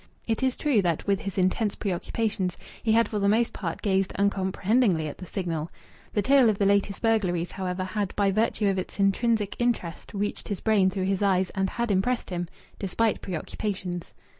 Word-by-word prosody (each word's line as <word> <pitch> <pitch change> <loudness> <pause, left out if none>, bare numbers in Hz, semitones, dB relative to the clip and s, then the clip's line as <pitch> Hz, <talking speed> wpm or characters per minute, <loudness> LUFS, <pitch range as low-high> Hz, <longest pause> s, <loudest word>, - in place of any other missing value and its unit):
It 225 +1 0
is 260 -1 +1
true 280 -9 +2
that, 170 -4 -1
with 200 -1 +1
his 195 0 -5
intense 195 +3 +1
preoccupations, 195 -1 -2 0.2
he 220 - +2
had 230 +1 +4
for 210 - -2
the 200 0 +2
most 225 +3 +2
part 165 -4 -4
gazed 195 -2 +1
uncomprehendingly 195 -2 +2
at 145 - -7
the 185 - -8
Signal. 165 -3 -3 0.4
The 205 - +1
tale 265 -3 +5
of 210 - +1
the 200 - +2
latest 200 +1 +1
burglaries, 185 -7 +1
however, 185 -1 -3
had 195 +1 -3
by 200 -1 +2
virtue 215 0 +1
of 195 -1 +1
its 185 - -7
intrinsic 205 +1 +2
interest 235 -9 -1
reached 205 +1 -2
his 200 -3 -3
brain 205 -4 +3
through 190 0 -3
his 195 0 0
eyes, 190 -2 +2
and 190 -1 0
had 235 -2 -1
impressed 230 +4 0
him, 175 -1 -2 0.3
despite 210 +3 0
preoccupations. 185 0 -4
200 Hz, 190 wpm, -26 LUFS, 185-220 Hz, 0.4 s, tale